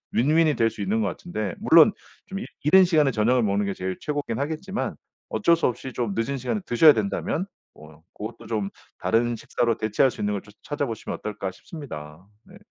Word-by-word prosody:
win-win이 155 +4 +3
될 115 0 +3
수 105 - -8
있는 105 +3 0
것 105 - +1
같은데 105 - -4
물론 165 +6 +7 0.4
좀 195 0 -5
이 - - -5 0.2
이른 185 +6 +7
시간에 155 -5 +3
저녁을 120 +2 +2
먹는 100 0 +1
게 100 - -1
제일 95 0 -4
최고긴 145 -6 -3
하겠지만 160 +8 -3 0.3
어쩔 170 -4 +3
수 165 - -1
없이 130 +2 -4
좀 115 -5 -2
늦은 115 +5 -1
시간에 130 - -2
드셔야 150 +6 +7
된다면 195 -1 -1 0.3
뭐 75 +1 -16
고것도 110 +2 -8
좀 105 -3 -2 0.3
다른 120 +1 +1
식사로 115 +1 -1
대체할 110 +5 +2
수 - - -8
있는 105 0 0
걸 100 - -3
좀 105 - -17
찾아보시면 145 -7 -3
어떨까 105 -2 -4
싶습니다. 85 - -9 0.2
네. 185 - -16
120 Hz, 410 characters per minute, -25 LUFS, 105-155 Hz, 0.4 s, 물론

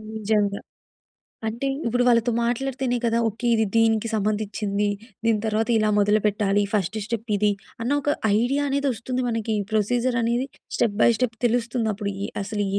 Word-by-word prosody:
నిజంగా. 210 -2 0 0.9
అంటే 235 +5 -3 0.2
ఇప్పుడు 245 +1 +2
వాళ్ళతో 235 0 +3
మాట్లాడితేనే 250 +1 -1
కదా! 230 0 +2
ఓకే. 230 +3 -5
ఇది 220 0 +3
దీనికి 225 0 +3
సంబందిచ్చింది. 210 -1 -1 0.4
దీని 225 -2 +2
తర్వాత 220 +2 0
ఇలా 215 - +2
మొదలుపెట్టాలి. 205 -1 +2
ఫస్ట్ 210 0 0
స్టెప్ 225 0 -4
ఇది. 210 +1 +2 0.3
అన్న 240 - -1
ఒక 290 +1 +1 0.3
ఐడియా 275 +4 +1
అనేది 280 +1 0
వస్తుంది 250 +3 -3
మనకి. 225 -1 -1 0.2
ప్రొసిజర్ 240 +3 +1
అనేది 240 +3 0 0.3
స్టెప్ 205 -4 +1
బై - - +7
స్టెప్ 245 -3 -1
తెలుస్తుందప్పుడు. 225 -3 -1
ఎ - - -10
అసలు 205 0 -2
225 Hz, 145 wpm, -24 LUFS, 210-240 Hz, 0.9 s, బై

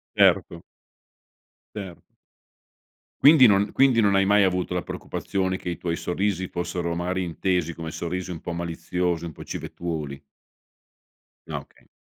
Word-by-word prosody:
Certo. - - +3 1.1
Certo. 95 -5 -7 1.2
Quindi 145 -2 +8
non 100 -1 +4
quindi 135 -3 +4
non 100 -3 +4
hai 95 0 +4
mai 100 +1 +5
avuto 90 -1 0
la 90 - -1
preoccupazione 95 -1 -3
che 90 - -5
i 85 - -3
tuoi 85 -1 -2
sorrisi 95 0 -1
fossero 85 -1 -3
magari 90 +2 -1
intesi 85 -1 -1
come 80 -1 -6
sorrisi 90 +2 -4
un 85 - -6
po' 85 - -5
maliziosi, 85 0 -2
un 85 - -5
po' - - -10
civettuoli? 75 -5 -5 1.3
Ah - - -2
okay. - - -24
90 Hz, 140 wpm, -25 LUFS, 85-95 Hz, 1.3 s, Quindi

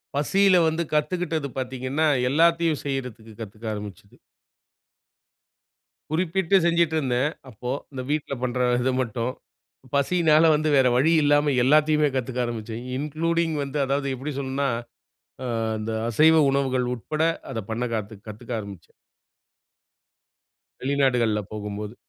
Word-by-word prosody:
பசில 185 +6 +4
வந்து 160 +1 0
கத்துக்கிட்டது 155 0 -1
பாத்தீங்கன்னா, 130 +4 -1 0.2
எல்லாத்தையும் 165 +1 +2
செய்றதுக்கு 125 -5 -5
கத்துக்க 110 +1 -9
ஆரம்பிச்சது. 105 -1 -9 2.0
குறிப்பிட்டு 185 +2 +1
செஞ்சுட்ருந்தேன். 155 -6 +1 0.2
அப்போ, 125 +2 -6 0.2
இந்த 130 -1 -5
வீட்ல 150 -2 -1
பண்ற 125 0 -1 0.2
இது 130 +1 +1
மட்டும். 120 +1 -3 0.6
பசியினால 155 +2 +3
வந்து, 155 +1 0
வேற 130 -1 +5
வழி 155 +6 +3
இல்லாம. 145 0 +3
எல்லாவத்தையுமே 150 +2 +4
கத்துக்க 125 0 -2
ஆரம்பிச்சேன். 115 0 -5 0.2
இன்க்ளூடிங் 165 +2 -1
வந்து 140 +2 -4
அதாவது 140 +1 -1
எப்பிடி 140 +4 -5
சொல்லனும்னா, 135 0 -1 0.8
ஆ - - -3 0.3
அந்த 110 +1 -4 0.2
அசைவ 160 +6 +5
உணவுகள் 130 -2 0
உட்பட 155 +6 -3 0.3
அத 115 - -3
பண்ண 115 +2 -2
கத்து 110 0 -5
கத்துக்க 110 +3 -9
ஆரம்பிச்சேன். 100 -5 -10 1.9
வெளிநாடுகள்ல 125 -5 +1
போகும்போது. 105 0 -6
135 Hz, 110 wpm, -24 LUFS, 120-155 Hz, 2.0 s, வேற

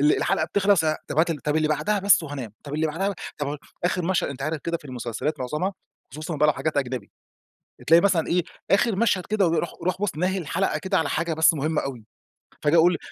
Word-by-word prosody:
ال 150 +1 +4
الحلقة 155 - +1
بتخلص، 195 0 +3
ه 155 -1 +1
طب - - -2
هات 165 +2 +4
ال 160 - -2
طب 150 +2 -1
اللي 155 -1 +2
بعدها 155 +8 +1
بس 200 -2 +5
وهانام، 140 -8 -6
طب 145 0 -6
اللي 160 +1 +1
بعدها 195 +6 -1 0.2
طب 145 0 -2 0.3
آخر 180 0 +1
مشهد 185 +1 +1
أنت 135 -1 -6
عارف 155 +3 -1
كده 170 0 0
في - - -22
المسلسلات 130 +3 -4
معظمها، 150 +10 -2 0.4
خصوصًا 155 +2 -5
بقى 150 - +4
لو - - +5
حاجات 155 0 -3
أجنبي، 130 -6 -2 0.8
تلاقي 165 +2 +7
مثلًا 180 -4 +2
إيه، 180 +1 +2 0.3
آخر 205 +1 +3
مشهد 195 -4 +1
كده 210 -3 +2
و 165 - +1
يروح 170 - -1
يروح 185 +1 -1
بُص 195 -7 -1
ناهي 185 +4 0
الحلقة 185 +3 -1
كده 190 0 0
على 160 - 0
حاجة 170 -1 -1
بس 160 +1 +5
مهمة 155 +1 0
أوي، 125 -5 -6 0.6
فاجي 150 +3 +3
أقول 170 +1 +5
160 Hz, 225 wpm, -24 LUFS, 150-185 Hz, 0.8 s, تلاقي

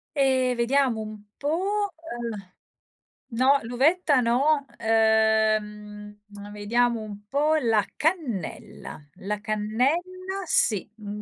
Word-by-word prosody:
Ehm, 260 -2 +2
vediamo 245 0 +1
un 215 -1 -8 0.2
po': 385 +7 -1
eh, 235 - -7 0.8
no, 270 +4 +4
l'uvetta 280 +5 +2
no. 275 +5 +2
Uhm, 215 -2 +1
uhm, 205 0 -11
vediamo 230 +3 0
un 205 -1 -9
po' 295 +5 +1
la 225 -5 +2
cannella. 250 - -4
La 205 +2 -3
cannella 315 - -2
sì, 215 - +2
un 210 -1 -7
235 Hz, 100 wpm, -25 LUFS, 210-285 Hz, 0.8 s, no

